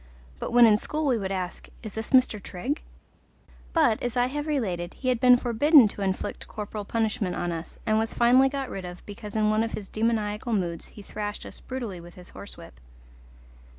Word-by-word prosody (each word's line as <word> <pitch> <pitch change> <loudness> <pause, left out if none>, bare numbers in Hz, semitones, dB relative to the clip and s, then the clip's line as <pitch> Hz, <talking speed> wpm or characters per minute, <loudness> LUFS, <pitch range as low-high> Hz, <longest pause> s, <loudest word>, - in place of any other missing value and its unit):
but - - -4
when 240 0 +7
in 215 -2 +6
school 305 +7 -2
we 265 -4 +3
would 195 -1 -3
ask, 185 -2 -4
"Is 215 -3 -7
this 220 +1 -5
Mr. 255 -5 +4
Trigg?" 245 - -4 0.9
But, 300 -10 +3
as 245 0 -2
I 245 - +4
have 295 +4 -3
related, 185 - -2
he 255 - -2
had 250 -2 +1
been 250 -1 +7
forbidden 250 +2 +5
to 205 - -6
inflict 190 -1 -3
corporal 210 -1 -6
punishment 215 -4 -1
on 175 - -2
us, 165 0 -6
and 215 0 +2
was 225 0 0
finally 255 +3 +5
got 275 -1 -3
rid 195 - -5
of 180 0 -9
because 210 0 -9
in 215 -1 +3
one 215 +1 +2
of 225 0 -2
his 200 - -5
demoniacal 220 +1 -1
moods 175 -5 -2
he 205 - -13
thrashed 205 0 -5
us - - -8
brutally 230 -9 -6
with 175 0 -13
his 180 0 -12
horsewhip. 85 - -11
220 Hz, 200 wpm, -26 LUFS, 195-245 Hz, 0.9 s, when